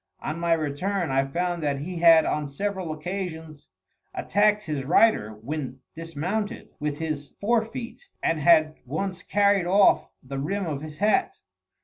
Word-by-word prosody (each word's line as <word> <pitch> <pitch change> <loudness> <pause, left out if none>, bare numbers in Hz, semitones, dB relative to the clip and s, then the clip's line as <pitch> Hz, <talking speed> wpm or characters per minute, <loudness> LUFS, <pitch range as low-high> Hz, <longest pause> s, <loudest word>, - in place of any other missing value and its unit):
On 155 +2 -4
my 170 0 +2
return, 165 +3 -1
I 135 +1 +2
found 175 +3 -2
that 145 -2 0
he 175 +4 -5
had 165 -1 +7
on 150 -1 -1
several 190 +3 -3
occasions 160 -2 -6 0.5
attacked 210 0 +2
his 150 -6 -3
rider, 140 - +3
when 135 -1 -4 0.2
dismounted, 175 +8 -4
with 150 -1 -2
his 150 -3 -4
fore 225 +2 +2
feet, 240 - -8 0.2
and 165 - +1
had 155 0 +4
once 180 +7 -4
carried 200 -2 +2
off 195 +2 +4
the 135 +1 -5
rim 195 +8 -2
of 145 -4 -3
his 155 0 -9
hat. 215 - +2
165 Hz, 150 wpm, -25 LUFS, 150-200 Hz, 0.5 s, had